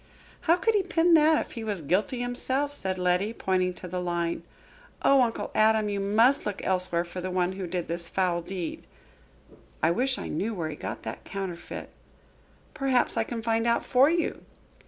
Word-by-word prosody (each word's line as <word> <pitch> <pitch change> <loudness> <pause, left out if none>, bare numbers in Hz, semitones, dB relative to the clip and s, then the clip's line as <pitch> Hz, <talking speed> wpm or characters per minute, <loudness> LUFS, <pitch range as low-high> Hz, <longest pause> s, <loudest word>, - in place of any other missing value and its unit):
"How 335 - +8
could 415 +5 +1
he 415 - +3
pen 340 -1 +2
that 310 0 +5
if - - -16
he 230 - -6
was 205 -6 -3
guilty 195 - 0
himself?" 260 +4 -1
said 190 -8 -1
Letty, 180 +4 +1
pointing 185 -3 0
to 180 - -8
the 180 +1 -3
line. 170 -1 -1 0.6
"Oh, 275 -1 +6
Uncle 230 -2 -1
Adam, 215 -1 +3
you 200 -1 -2
must 225 +7 +4
look 205 - -3
elsewhere 180 -2 +1
for 180 +1 -7
the 185 - -3
one 180 0 0
who 190 -1 -5
did 175 0 -3
this 170 0 -1
foul 180 -2 0
deed." 175 -1 -6 1.0
"I 165 - +4
wish 255 +8 +1
I - - -5
knew 210 +8 -2
where 165 -4 -3
he - - -6
got - - -6
that - - -6
counterfeit?" 190 -3 -6 0.8
"Perhaps 265 -3 +1
I 225 - +2
can 230 0 -5
find 225 0 +1
out 235 - +1
for 265 +3 +5
you." 335 +1 -1
200 Hz, 190 wpm, -27 LUFS, 180-245 Hz, 1.0 s, How